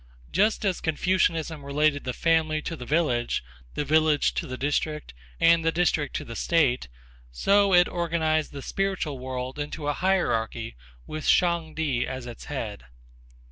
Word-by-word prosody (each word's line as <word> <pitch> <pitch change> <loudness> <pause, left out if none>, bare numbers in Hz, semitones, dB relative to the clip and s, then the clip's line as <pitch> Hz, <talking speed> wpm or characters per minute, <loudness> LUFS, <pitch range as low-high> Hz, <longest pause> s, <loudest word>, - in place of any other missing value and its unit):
Just 210 +4 +2
as 190 -3 0
Confucianism 165 -2 0
related 145 +1 +1
the 130 - -1
family 160 0 +2
to 165 - -4
the 125 -5 -9
village, 125 - +1 0.3
the 145 - -1
village 155 -1 +3
to - - -3
the 130 - -5
district, 145 - -2 0.3
and 165 0 +5
the 165 - +2
district 165 -3 0
to - - -3
the 115 - -8
state, 145 - +1 0.4
so 200 - +3
it 175 -1 +6
organized 160 -2 0
the 140 -1 -8
spiritual 190 -8 -2
world 130 +1 -5
into 145 0 -4
a 145 - +1
hierarchy 120 -11 0 0.3
with 155 0 -5
Shang 170 -3 +2
Ti 140 -6 0
as 130 -1 -5
its 120 -2 -9
head. 110 - -5
155 Hz, 155 wpm, -26 LUFS, 130-170 Hz, 0.4 s, it